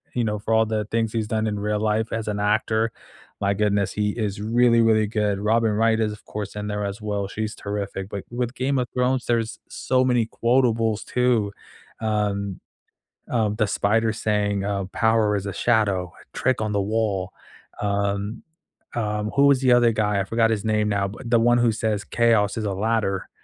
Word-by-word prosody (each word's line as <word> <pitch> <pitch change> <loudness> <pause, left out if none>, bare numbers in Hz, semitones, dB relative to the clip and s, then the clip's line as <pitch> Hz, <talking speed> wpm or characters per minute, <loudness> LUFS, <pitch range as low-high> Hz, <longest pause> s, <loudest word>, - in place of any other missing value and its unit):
you 120 - +1
know, 105 -1 -1
for 110 +2 -2
all 110 0 +4
the 110 -1 -2
things 115 +1 -1
he's 110 -2 -2
done 110 0 -1
in 105 -1 -2
real 105 +1 -1
life 110 +1 0
as 110 -1 -3
an 105 -1 -2
actor, 110 +2 +1 0.5
my 100 0 +2
goodness, 100 -1 +1
he 105 0 0
is 105 -3 -3
really, 115 +2 +3
really 110 -2 +4
good, 105 -2 0
Robin 110 +2 +2
Wright 110 +1 +2
is 110 -1 0
of 105 - -13
course 105 -1 -6
in 105 0 -4
there 105 0 -2
as 100 +2 -5
well, 105 -2 -2
she's 110 +3 -4
terrific, 100 -2 -4
but 100 -2 -5
with 120 0 -3
Game 135 +2 0
of 125 -1 0
Thrones, 125 0 +1
there 120 -1 +2
is 115 0 -5
so 130 0 0
many 125 -3 +2
quotables 115 -3 +1
too, 125 -5 +1 0.5
um 105 -3 -1 0.7
um, 110 -4 0
the 110 -1 +1
Spider 110 +3 +1
saying, 105 -2 -1
uh, 100 -1 -1
"Power 110 -2 +2
is 100 - -5
a 100 - -4
shadow, 100 -6 +1
a - - -15
trick 130 -1 +1
on 110 -1 -2
the 100 - +1
wall." 100 -3 -1 0.5
Um, 100 +1 -1 0.5
um, 105 -2 -1
who 140 0 +5
was 140 -2 +4
the 130 -2 +3
other 120 -1 +5
guy? 105 -2 +1
I 95 - -1
forgot 115 +2 +2
his 110 -2 -1
name 105 -1 +1
now, 100 -1 0
but 115 +5 -8
the 115 -1 +4
one 120 +1 +4
who 120 -1 +3
says, 110 -2 -1
"Chaos 110 -2 +2
is 110 - -2
a 100 - -1
ladder." 105 -1 -1
110 Hz, 200 wpm, -23 LUFS, 105-115 Hz, 0.7 s, who